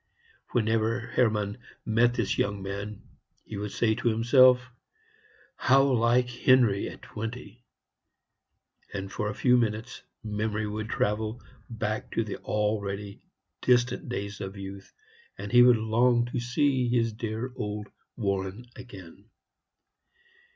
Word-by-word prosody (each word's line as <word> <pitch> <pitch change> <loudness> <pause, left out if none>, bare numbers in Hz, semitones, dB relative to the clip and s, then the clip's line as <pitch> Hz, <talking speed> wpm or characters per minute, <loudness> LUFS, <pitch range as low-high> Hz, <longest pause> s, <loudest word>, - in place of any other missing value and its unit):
Whenever 115 0 +1
Hermann 110 -3 0 0.3
met 120 +2 +3
this 115 -5 0
young 100 -1 -1
man 100 +2 -6 0.4
he 110 - -8
would 105 0 -4
say 110 -2 +1
to 120 +2 -3
himself, 125 +2 +5 0.8
"How 135 +1 +4
like 125 -2 +3
Henry 125 -4 +3
at - - -12
twenty!" 115 +2 -7 1.3
and 95 -1 -5
for 105 - -2
a 105 - -5
few 125 -1 +4
minutes 115 +2 -2 0.2
memory 105 0 -2
would 110 +1 -4
travel 110 +2 -1 0.3
back 110 -2 -3
to 115 - +1
the 105 - -5
already 105 -1 -2 0.4
distant 125 0 +2
days 100 -3 -4
of 95 0 -6
youth, 95 0 -9 0.5
and - - -6
he 120 0 +7
would 120 -1 +7
long 120 +2 +2
to 125 - -1
see 125 +1 +1
his 115 -2 +1
dear 115 +3 -4
old 105 -1 -4 0.3
Warren 100 +1 -2
again. 100 -4 -12
110 Hz, 125 wpm, -27 LUFS, 105-120 Hz, 1.3 s, he